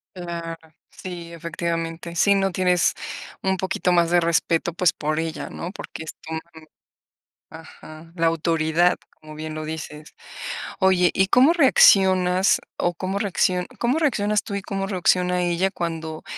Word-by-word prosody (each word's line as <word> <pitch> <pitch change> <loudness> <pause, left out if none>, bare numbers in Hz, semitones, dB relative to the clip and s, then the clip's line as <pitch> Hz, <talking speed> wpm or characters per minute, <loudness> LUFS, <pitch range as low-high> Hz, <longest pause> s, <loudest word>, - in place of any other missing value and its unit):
Claro. 170 -2 -5 0.4
Sí, 175 -2 -8
efectivamente. 170 0 -4
¿Sí, 200 +4 +4
no? 195 -1 +1
Tienes 180 -2 +2 0.5
un 190 0 0
poquito 185 0 -1
más 170 -1 +3
de 175 - +5
respeto, 170 0 +1
pues, 180 0 +2
por 155 +1 -2
ella, 165 0 -4
¿no? 175 - -6
Porque 175 - -8
es 160 - -7
tu 160 - -7
mamá. 160 - -4 1.1
Ajá, 160 0 -13
la 165 -1 +1
autoridad, 165 +1 +2 0.2
como 155 0 -11
bien 155 0 -6
lo 155 0 -5
dices. 155 -1 -7 0.7
Oye, 185 -2 +4
¿y 190 - +2
cómo 260 - +5
reaccionas? 190 - +5 0.2
O 175 0 0
¿cómo 190 +3 -3
reacciona? 185 -2 0
¿Cómo 250 +7 +1
reaccionas 210 -8 +1
tú 200 - -5
y 200 - -2
cómo 195 -1 -3
reacciona 180 -1 +1
ella 175 +2 +1
cuando 165 -3 -5
175 Hz, 150 wpm, -23 LUFS, 165-190 Hz, 1.1 s, de